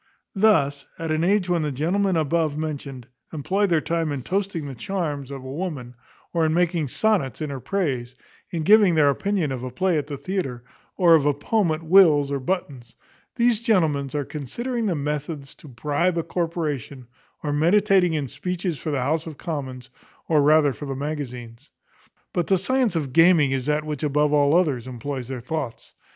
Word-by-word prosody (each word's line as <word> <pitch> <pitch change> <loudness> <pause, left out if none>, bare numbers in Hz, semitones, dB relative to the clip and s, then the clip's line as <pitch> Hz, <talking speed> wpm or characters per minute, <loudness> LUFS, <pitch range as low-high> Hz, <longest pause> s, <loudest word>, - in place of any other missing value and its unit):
Thus 150 -10 +2
at 165 -1 -3
an 155 +1 +1
age 195 +1 +2
when 175 -2 +1
the 150 -1 -1
gentlemen 180 +8 0
above 155 -1 0
mentioned 140 -5 -5 0.2
employ 190 +7 0
their 165 -4 +2
time 165 -1 -1
in 140 -3 -4
toasting 190 -2 -2
the 140 - -6
charms 145 0 -4
of 135 -2 -7
a 130 - -7
woman, 145 -7 -5 0.4
or 170 -2 +2
in 160 0 +1
making 170 -3 +1
sonnets 190 - 0
in 155 -2 -3
her 135 - -5
praise; 130 -8 -2 0.3
in 165 -2 -3
giving 205 -1 +6
their 145 -2 +5
opinion 190 -1 -1
of 130 -2 -4
a 130 - -4
play 170 +6 +1
at 145 - -5
the 145 -2 -5
theatre, 135 -10 -4 0.3
or 175 -3 +6
of 150 -3 +4
a 145 - +2
poem 195 +6 0
at 155 +1 -2
Will's 160 -5 +5
or 140 - -1
Button's; 130 -6 -4 0.4
these 235 -2 +2
gentlemen 160 - +1
are 145 -1 -1
considering 230 - -4
the 180 - 0
methods 150 -1 -4
to - - -16
bribe 150 +8 -1
a 165 - 0
corporation, 155 -7 -3 0.4
or 145 -2 -1
meditating 175 -2 +3
speeches 180 +1 -4
for 155 - -4
the 140 -4 -1
House 160 +4 -1
of 155 -3 -8
Commons, 130 -6 -6 0.4
or 155 -3 +3
rather 150 -1 +4
for 145 - -8
the 135 - -3
magazines. 135 -3 -6 0.6
But 175 -2 -1
the 190 - +3
science 245 +3 0
of 140 -6 -2
gaming 165 -4 +5
is 135 0 -2
that 150 +1 0
which 150 -3 -4
above 150 0 +1
all 145 +1 +4
others 140 -9 +1
employs 130 0 -5
their 130 -2 -5
thoughts. 135 -1 -5
155 Hz, 185 wpm, -23 LUFS, 140-180 Hz, 0.6 s, giving